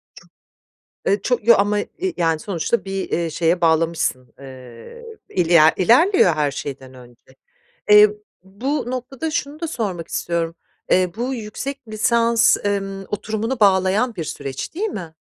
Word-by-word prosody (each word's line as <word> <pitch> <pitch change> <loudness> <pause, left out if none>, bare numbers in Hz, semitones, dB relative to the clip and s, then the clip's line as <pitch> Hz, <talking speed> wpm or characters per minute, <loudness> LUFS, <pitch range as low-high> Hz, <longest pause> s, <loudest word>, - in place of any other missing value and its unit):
Ço - - -16 0.8
Eee, 200 - +2
ço 245 -2 +1
ya, 230 +1 +7
ama, 205 +1 +1
eee, 365 - -4
yani, 165 -2 +1
sonuçta 195 +6 -2
bir, 195 0 -4
eee, 170 0 -1
şeye 170 +2 0
bağlamışsın, 160 -7 0
eee, 130 - -12 0.2
iler 165 -3 +4
ilerliyor 240 - +4
her 150 -2 0
şeyden 135 -2 -7
önce. 125 +1 -18 0.5
Eee, 210 0 +8 0.3
bu 245 +8 -3
noktada 260 +5 -4
şunu 295 0 -3
da 335 - -3
sormak 195 - -4
istiyorum, 170 -1 -2 0.4
eee, 185 -1 +3
bu 250 +3 -2
yüksek 250 +5 -6
lisans, 230 +2 +3
emm, 195 -1 -2
oturumunu 220 +4 -3
bağlayan 200 +4 +2
bir 165 - -4
süreç 135 -3 -6
değil 400 +6 -1
mi? 175 - -7
195 Hz, 140 wpm, -20 LUFS, 165-235 Hz, 0.8 s, Eee